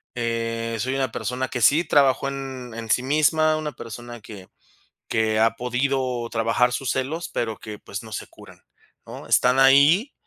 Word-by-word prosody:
Eh, 115 Hz, -1 st, -2 dB
soy 130 Hz, +4 st, -1 dB
una 135 Hz, -3 st, -1 dB
persona 125 Hz, +3 st, -3 dB
que 125 Hz, -, -3 dB
sí 150 Hz, +8 st, +5 dB
trabajó 140 Hz, -4 st, +3 dB
en 135 Hz, -3 st, -7 dB
en 115 Hz, -1 st, -7 dB
sí 125 Hz, -, +3 dB
misma, 155 Hz, +3 st, +2 dB
una 155 Hz, -1 st, -4 dB
persona 120 Hz, +1 st, -9 dB
que 100 Hz, -3 st, -11 dB, 0.6 s
que 110 Hz, -1 st, 0 dB
ha 115 Hz, +1 st, +3 dB
podido 125 Hz, 0 st, -1 dB
trabajar 115 Hz, +2 st, +1 dB
sus 130 Hz, +1 st, -3 dB
celos, 145 Hz, +6 st, -3 dB
pero 110 Hz, -3 st, -3 dB
que, 105 Hz, -1 st, -8 dB
pues, 100 Hz, 0 st, -7 dB
no 110 Hz, -2 st, -12 dB
se 105 Hz, -, -5 dB
curan, -, -, -17 dB, 0.4 s
¿no? -, -, -10 dB
Están 125 Hz, +1 st, +3 dB
ahí, 145 Hz, -, +5 dB
125 Hz, 170 wpm, -23 LUFS, 115-135 Hz, 0.6 s, sí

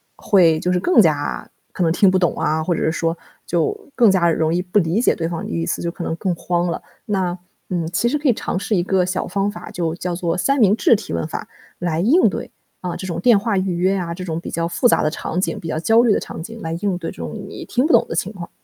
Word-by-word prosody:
会 170 Hz, -6 st, +4 dB
就 180 Hz, -, 0 dB
是 180 Hz, -, +2 dB
更 340 Hz, -, +5 dB
加 150 Hz, -6 st, 0 dB, 0.2 s
可 185 Hz, -, -1 dB
能 165 Hz, -, +2 dB
听 195 Hz, +2 st, +4 dB
不 185 Hz, -, +2 dB
懂 175 Hz, -3 st, +2 dB
啊， 155 Hz, +1 st, 0 dB
或 175 Hz, -, 0 dB
者 -, -, -2 dB
是 160 Hz, -, +1 dB
说， 165 Hz, 0 st, -1 dB, 0.3 s
就 425 Hz, -6 st, -1 dB
更 235 Hz, -4 st, +5 dB
加 175 Hz, -3 st, +3 dB
容 160 Hz, +1 st, +1 dB
易 180 Hz, -, +1 dB
不 180 Hz, +3 st, +1 dB
理 175 Hz, +4 st, +1 dB
解 -, -, +3 dB
对 165 Hz, -1 st, -2 dB
方 170 Hz, -1 st, -4 dB
的 -, -, -6 dB
意 85 Hz, 0 st, -2 dB
思， -, -, -2 dB
就 170 Hz, -, -2 dB
可 -, -, -9 dB
能 165 Hz, -, -2 dB
更 180 Hz, +2 st, -1 dB
慌 175 Hz, +1 st, -1 dB
了。 170 Hz, -, -3 dB, 0.2 s
那， 185 Hz, -4 st, -1 dB, 0.3 s
嗯， 175 Hz, -3 st, -1 dB
其 205 Hz, +7 st, +1 dB
实 295 Hz, +5 st, +1 dB
可 290 Hz, -1 st, +1 dB
以 -, -, +5 dB
尝 195 Hz, -, -3 dB
试 205 Hz, +3 st, -2 dB
一 -, -, +2 dB
个 185 Hz, 0 st, +1 dB
小 185 Hz, +1 st, -2 dB
方 200 Hz, +2 st, -1 dB
法， 215 Hz, -, -9 dB
就 175 Hz, -6 st, -2 dB
叫 180 Hz, -1 st, -3 dB
做 170 Hz, 0 st, -1 dB
三 275 Hz, +9 st, +1 dB
明 205 Hz, -2 st, +5 dB
治 230 Hz, -, +5 dB
提 -, -, -6 dB
问 85 Hz, -1 st, -2 dB
法 -, -, -6 dB, 0.3 s
来 170 Hz, -2 st, -1 dB
应 270 Hz, -, +4 dB
对， -, -, -5 dB, 0.3 s
嗯， 180 Hz, -1 st, -3 dB
这 -, -, -6 dB
种 170 Hz, -2 st, -3 dB
电 230 Hz, +4 st, +5 dB
话 205 Hz, 0 st, 0 dB
预 185 Hz, -1 st, 0 dB
约 185 Hz, +3 st, +1 dB
啊， 170 Hz, -2 st, -3 dB
这 185 Hz, -, -7 dB
种 165 Hz, -2 st, -3 dB
比 -, -, -7 dB
较 165 Hz, 0 st, -1 dB
复 170 Hz, +8 st, +2 dB
杂 -, -, +3 dB
的 155 Hz, -, +2 dB
场 170 Hz, +3 st, -3 dB
景， -, -, -2 dB
比 165 Hz, -, -7 dB
较 155 Hz, -, -2 dB
焦 225 Hz, +7 st, +4 dB
虑 230 Hz, -4 st, +4 dB
的 -, -, 0 dB
场 -, -, -7 dB
景 225 Hz, +5 st, -9 dB
来 160 Hz, -, -4 dB
应 195 Hz, -3 st, 0 dB
对 170 Hz, -2 st, -5 dB
这 -, -, -15 dB
种 -, -, -5 dB, 0.2 s
你 -, -, -8 dB
听 250 Hz, +3 st, 0 dB
不 315 Hz, -, +2 dB
懂 -, -, +5 dB
的 -, -, -4 dB
情 195 Hz, -, -1 dB
况。 175 Hz, -5 st, -8 dB
180 Hz, 305 characters per minute, -20 LUFS, 170-205 Hz, 0.3 s, 更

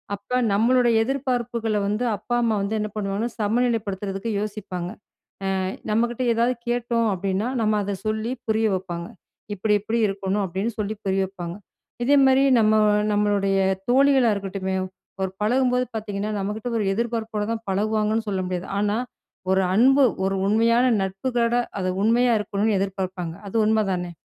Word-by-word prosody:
அப்ப, 250 Hz, +5 st, -2 dB
நம்மளோட 240 Hz, +4 st, +3 dB
எதிர்பார்ப்புகள 240 Hz, -4 st, -1 dB
வந்து 210 Hz, +4 st, -1 dB
அப்பா, 240 Hz, -, -3 dB
அம்மா 225 Hz, -2 st, +2 dB
வந்து 200 Hz, +2 st, -1 dB
என்ன 215 Hz, 0 st, -2 dB
பண்ணுவாங்கணா, 205 Hz, +3 st, -2 dB
சமநிலைப்படுத்துறதுக்கு 210 Hz, -2 st, -1 dB
யோசிப்பாங்க. 190 Hz, -4 st, -4 dB, 0.8 s
அ -, -, -1 dB, 0.2 s
நம்மகிட்ட 235 Hz, +3 st, 0 dB
ஏதாவது 235 Hz, +2 st, +1 dB
கேட்டோம் 235 Hz, -1 st, 0 dB
அப்டின்னா 195 Hz, +3 st, -1 dB
நம்ம 215 Hz, -1 st, +2 dB
அத 200 Hz, 0 st, -2 dB
சொல்லி 220 Hz, +2 st, -1 dB, 0.2 s
புரிய 220 Hz, 0 st, +2 dB
வைப்பாங்க. 175 Hz, -2 st, -5 dB, 0.5 s
இப்டி, 210 Hz, +2 st, +1 dB
இப்டி 225 Hz, +2 st, -1 dB
இருக்கணும் 195 Hz, +1 st, -1 dB
அப்டின்னு 195 Hz, +6 st, -3 dB
சொல்லி 210 Hz, +1 st, -2 dB
புரிய 195 Hz, 0 st, +1 dB
வைப்பாங்க. 175 Hz, -3 st, -6 dB, 0.5 s
இதேமாரி, 270 Hz, -1 st, +5 dB, 0.2 s
நம்ம 215 Hz, 0 st, +4 dB, 0.4 s
நம்மளுடைய 205 Hz, -1 st, +1 dB, 0.3 s
தோழிகளா 265 Hz, -2 st, +4 dB
இருக்கட்டுமே, 195 Hz, -1 st, -3 dB, 0.5 s
ஒரு 190 Hz, -, -2 dB
பழகும்போது 250 Hz, +2 st, +2 dB
பாதீங்கன்னா 210 Hz, -1 st, -3 dB
நம்மகிட்ட 210 Hz, +4 st, -3 dB
ஒரு 205 Hz, -, 0 dB
எதிர்ப்பார்ப்போட 225 Hz, -2 st, -2 dB
தான் 225 Hz, 0 st, -5 dB
பழகுவாங்கன்னு 215 Hz, +2 st, 0 dB
சொல்ல 190 Hz, -2 st, -1 dB
முடியாது. 180 Hz, 0 st, -4 dB
ஆனா 210 Hz, +1 st, +1 dB, 0.5 s
ஒரு 190 Hz, -, +3 dB
அன்பு, 270 Hz, +6 st, +5 dB, 0.2 s
ஒரு 195 Hz, 0 st, 0 dB
உண்மையான 230 Hz, +4 st, +3 dB, 0.2 s
நட்புகளோட 235 Hz, +5 st, 0 dB, 0.2 s
அது 185 Hz, -, -1 dB
உண்மையா 240 Hz, +2 st, +3 dB
இருக்கணும்னு 205 Hz, 0 st, 0 dB
எதிர்பார்ப்பாங்க 185 Hz, -3 st, -3 dB
அது 195 Hz, -, -8 dB
உண்மை 220 Hz, 0 st, +3 dB
தானே? 180 Hz, -1 st, -3 dB
215 Hz, 140 wpm, -23 LUFS, 195-235 Hz, 0.8 s, இதேமாரி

